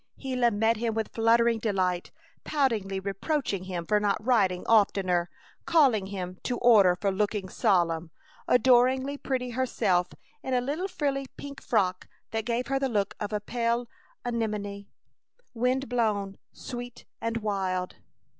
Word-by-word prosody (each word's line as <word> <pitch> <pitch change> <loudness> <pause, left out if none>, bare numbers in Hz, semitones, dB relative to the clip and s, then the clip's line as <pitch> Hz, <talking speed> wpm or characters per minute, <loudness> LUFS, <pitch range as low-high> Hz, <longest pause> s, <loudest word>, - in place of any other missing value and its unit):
Gila 255 -3 +1
met 225 +1 +1
him 225 0 -1
with 220 -1 -3
fluttering 230 0 +3
delight, 185 -5 0 0.3
poutingly 225 -10 0
reproaching 200 - -2
him 175 -2 -4
for 210 +4 +2
not 205 -1 +1
writing 195 -8 +2
oftener, 190 -5 +3 0.4
calling 265 - +4
him 185 -2 -6
to 245 - -2
order 210 -7 +6
for 195 +2 -1
looking 200 0 -1
solemn, 170 -3 +1 0.4
adoringly 260 +3 +4
pretty 255 -3 -3
herself 215 -8 +1 0.3
in 260 - -2
a - - +4
little 295 +9 -2
frilly 275 -6 -2
pink 280 0 -8
frock 185 -5 0 0.2
that 225 -1 -2
gave 240 +1 -1
her 270 0 0
the 270 -1 0
look 205 -4 0
of 210 -1 -4
a 210 - 0
pale 235 +2 -1 0.4
anemone, 210 -4 -3 0.7
wind 250 +3 0
blown 215 -5 0
and 195 - -16
sweet 245 -1 -8 0.2
and 230 0 -1
wild. 190 -4 -2
225 Hz, 145 wpm, -27 LUFS, 195-245 Hz, 0.7 s, order